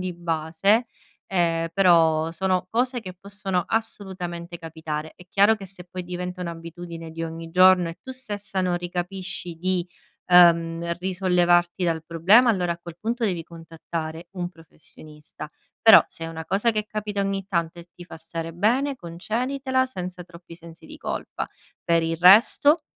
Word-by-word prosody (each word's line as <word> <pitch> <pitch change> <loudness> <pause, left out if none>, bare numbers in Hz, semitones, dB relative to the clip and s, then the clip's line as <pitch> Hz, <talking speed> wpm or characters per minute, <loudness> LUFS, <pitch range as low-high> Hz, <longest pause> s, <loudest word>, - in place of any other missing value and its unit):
di 185 -1 -3
base, 170 +6 +1 0.4
ehm, 165 -3 0
però 165 -4 +4
sono 185 +1 -1
cose 245 +2 0
che 185 -4 -9
possono 195 -3 -2
assolutamente 180 -6 -4
capitare. 160 -1 -6
È 180 - -15
chiaro 200 +4 +4
che 195 - -10
se 180 -1 -11
poi 185 -1 -6
diventa 180 +1 -5
un'abitudine 170 -1 -8
di 165 +1 -6
ogni 165 0 -7
giorno, 185 0 +5
e 165 - -7
tu 260 - -9
stessa 210 -6 -4
non 180 -1 0
ricapisci 180 0 -5
di 185 0 -1 0.4
uhm 170 -1 +5
risollevarti 180 -1 +2
dal 160 -2 -1
problema, 190 +10 +5
allora 180 -5 0
a 170 - -9
quel 170 0 -11
punto 235 +1 -2
devi 180 -5 -1
contattare 165 0 -7
un 175 -2 -4
professionista. 155 -2 -12 0.3
Però, 225 -2 +8
se 165 - -7
è - - -5
una 160 0 -7
cosa 200 +6 +1
che 215 -1 -1
capita 210 -1 -3
ogni 195 -1 -2
tanto 170 -2 -2
e 170 - -11
ti 175 - -11
fa 165 - -11
stare 165 0 -6
bene, 250 - +1
conceditela 255 +9 -2
senza 180 -6 -7
troppi 170 -1 -14
sensi 165 0 -14
di - - -12
colpa. - - -4 0.4
Per 170 -1 +2
il 165 0 -1
resto, 235 - +6
175 Hz, 160 wpm, -24 LUFS, 165-195 Hz, 0.4 s, Però